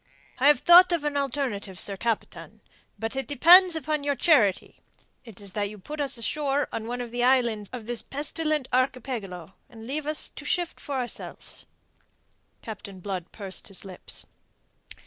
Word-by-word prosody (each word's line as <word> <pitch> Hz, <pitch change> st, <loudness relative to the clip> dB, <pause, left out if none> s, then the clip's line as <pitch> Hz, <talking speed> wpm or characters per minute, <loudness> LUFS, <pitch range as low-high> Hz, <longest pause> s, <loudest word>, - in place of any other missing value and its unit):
"I 270 Hz, -, +4 dB
have 295 Hz, -4 st, +5 dB
thought 355 Hz, +1 st, +8 dB
of 335 Hz, -4 st, 0 dB
an 295 Hz, -1 st, -1 dB
alternative, 245 Hz, -9 st, -2 dB
sir 200 Hz, -, -3 dB
captain; 230 Hz, +2 st, -4 dB, 0.4 s
but 225 Hz, +3 st, -4 dB
it 270 Hz, -3 st, -3 dB
depends 345 Hz, +5 st, +7 dB
upon 305 Hz, -2 st, -2 dB
your 285 Hz, 0 st, 0 dB
charity. 240 Hz, -, +2 dB, 0.4 s
It 225 Hz, -6 st, -12 dB
is 200 Hz, -2 st, -10 dB
that 205 Hz, +1 st, -2 dB
you 210 Hz, -, -10 dB
put 295 Hz, +10 st, -6 dB
us 275 Hz, -3 st, -2 dB
ashore 280 Hz, +5 st, 0 dB
on 220 Hz, -, -4 dB
one 245 Hz, +1 st, -3 dB
of 240 Hz, -1 st, -6 dB
the 240 Hz, 0 st, -1 dB
islands 235 Hz, -5 st, +2 dB
of 245 Hz, -3 st, -7 dB
this 240 Hz, 0 st, -3 dB
pestilent 300 Hz, 0 st, -2 dB
archipelago, 230 Hz, -9 st, -2 dB, 0.2 s
and 225 Hz, -1 st, -12 dB
leave 290 Hz, +4 st, -4 dB
us 305 Hz, 0 st, -2 dB
to -, -, -11 dB
shift 350 Hz, -2 st, -2 dB
for 285 Hz, -, -5 dB
ourselves." 250 Hz, -2 st, -6 dB, 1.0 s
Captain 200 Hz, -3 st, -8 dB
Blood 185 Hz, -2 st, -5 dB
pursed 195 Hz, -3 st, -4 dB
his 195 Hz, -1 st, -4 dB
lips. 185 Hz, -2 st, -8 dB
250 Hz, 165 wpm, -26 LUFS, 210-290 Hz, 1.0 s, thought